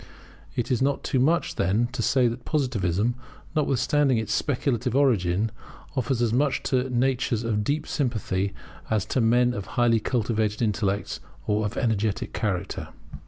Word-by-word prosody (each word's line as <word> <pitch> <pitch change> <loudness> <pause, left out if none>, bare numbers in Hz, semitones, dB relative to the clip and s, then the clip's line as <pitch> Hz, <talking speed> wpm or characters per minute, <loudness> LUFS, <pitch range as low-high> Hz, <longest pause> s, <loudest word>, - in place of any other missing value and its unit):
It 120 +2 -1
is 125 - +1
not 140 +1 +1
too 130 - 0
much, 160 +7 +1
then, 100 +5 +2
to 125 - -3
say 125 +1 +3
that 120 +1 -4
Positivism, 115 - 0 0.4
notwithstanding 145 -2 +2
its 110 -1 -1
speculative 125 -3 0
origin, 110 -7 +2 0.4
offers 130 -1 0
as 115 -2 +1
much 140 +1 +1
to 130 0 0
natures 125 -2 +1
of 105 -2 0
deep 150 +6 -1
sympathy 105 -7 -1 0.4
as 110 -3 +1
to 130 - 0
men 120 +2 +3
of 100 -3 -5
highly 120 -2 +4
cultivated 110 -2 0
intellects, 105 -2 -1 0.3
or 105 0 +1
of 105 - -7
energetic 110 -4 0
character. 100 -6 -2
120 Hz, 150 wpm, -25 LUFS, 105-130 Hz, 0.4 s, highly